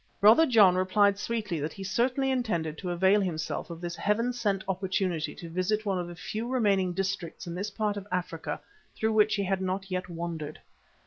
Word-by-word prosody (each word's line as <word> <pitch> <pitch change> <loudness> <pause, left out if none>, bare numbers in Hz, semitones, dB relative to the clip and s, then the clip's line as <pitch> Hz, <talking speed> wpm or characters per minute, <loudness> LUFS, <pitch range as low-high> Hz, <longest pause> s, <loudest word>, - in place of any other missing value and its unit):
Brother 225 +11 +7
John 210 -8 +6
replied 200 +2 +3
sweetly 210 -7 -2
that 150 +2 -3
he 195 - -8
certainly 255 +7 +1
intended 175 -12 -1
to 185 - -4
avail 190 +4 +4
himself 170 -3 -3
of 170 -1 -7
this 175 -1 -4
heaven 230 +6 +1
sent 205 -5 -1
opportunity 185 -3 -1
to 170 - -8
visit 185 +6 -1
one 195 -3 0
of 175 - -3
the 175 - -8
few 220 +6 -4
remaining 200 -7 +2
districts 195 -1 -3
in 170 - -5
this 195 +4 -3
part 210 0 -1
of 200 0 -7
Africa 175 -3 -3 0.4
through 220 0 0
which 215 0 +4
he 200 - 0
had 190 0 0
not 190 +1 -3
yet 185 0 -2
wandered. 165 -3 -5
195 Hz, 195 wpm, -28 LUFS, 175-210 Hz, 0.4 s, Brother